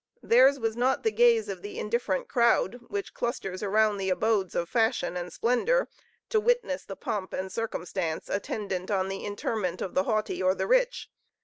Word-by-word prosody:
Theirs 260 +4 +6
was 225 -3 -2
not 250 +2 +1
the 445 - +2
gaze 470 -1 +4
of - - -5
the 410 +1 -7
indifferent 480 +1 -1
crowd, 235 -2 +2
which 405 -1 -4
clusters 195 -6 -3
around 210 +1 +2
the 190 -1 -2
abodes 195 -1 +1
of 170 - 0
fashion 225 -3 +1
and 180 0 -4
splendor, 460 - +1 0.4
to 440 - +3
witness 465 - +1
the 195 - -8
pomp 190 0 -4
and 190 0 -3
circumstance 180 -6 -3
attendant 195 -2 -3
on 190 -2 0
the 195 0 -5
interment 205 -2 -2
of 185 - -4
the 185 - +1
haughty 215 -3 -1
or 185 0 +3
the - - -2
rich. - - +2
220 Hz, 180 wpm, -28 LUFS, 190-280 Hz, 0.4 s, Theirs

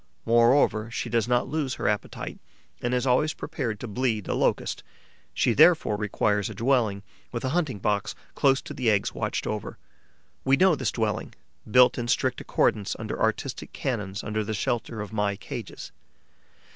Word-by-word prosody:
Moreover, 115 -1 +4
she 115 0 -4
does 115 -1 +1
not 120 0 +2
lose 150 -4 -2
her - - -2
appetite 105 -1 -3 0.4
and 120 - -1
is 125 0 +1
always 135 +5 +2
prepared 125 -9 -4
to 125 - -6
bleed 110 -2 -1
a - - 0
Locust. - - 0 0.5
She 120 - +2
therefore 155 -6 +5
requires 105 0 0
a 110 - -8
dwelling 115 -4 +1 0.3
with 120 +1 -4
a - - 0
hunting 150 -7 0
box 100 0 -1 0.2
close 135 -2 +2
to - - -7
the 125 -3 +1
eggs 100 -2 +1
watched - - -2
over. 105 -2 -4 0.7
We 135 +1 +4
know 185 +2 +5
this 150 - -1
dwelling, 110 -2 -2 0.3
built 125 +3 +5
in 120 - -3
strict - - 0
accordance 100 -2 +1
with - - -5
artistic - - -2
canons 105 -6 -3
under 105 0 -2
the 110 +1 -3
shelter 110 +1 -2
of 105 +1 -7
my 105 -2 0
cages. - - -8
115 Hz, 170 wpm, -26 LUFS, 105-130 Hz, 0.7 s, therefore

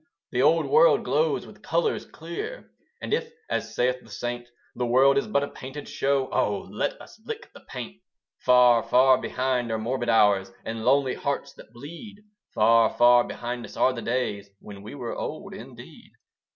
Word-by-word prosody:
The 125 - +1
old 160 +4 +4
world 485 +3 +5
glows 480 - +1
with - - -15
colours 460 -3 -1
clear; 440 +4 -7 0.3
And - - -2
if, 465 0 -1 0.2
as - - -3
saith 125 +1 +1
the 115 - -18
saint, 120 +3 -5 0.3
The 125 0 -1
world 130 +3 +5
is 210 +1 0
but 165 -10 +1
a - - -2
painted 135 +2 -9
show, 135 -1 0
Oh 105 -1 0
let - - -2
us - - -15
lick - - -8
the - - -13
paint! 70 0 -9 0.4
Far, 125 -2 +5
far 130 +2 +4
behind 125 -2 -1
are 110 - 0
morbid 120 +2 -2
hours, 100 -3 +3
And 110 0 -5
lonely 135 0 +3
hearts 140 0 -3
that - - -16
bleed. 170 - -11 0.3
Far, 115 +1 +4
far 120 0 +5
behind 120 0 -5
us - - -10
are 130 - +3
the 120 - -6
days, 105 -5 -2
When 100 -1 -11
we 105 +6 -9
were 120 -4 -5
old - - -6
indeed. - - -12
125 Hz, 180 wpm, -25 LUFS, 115-140 Hz, 0.4 s, world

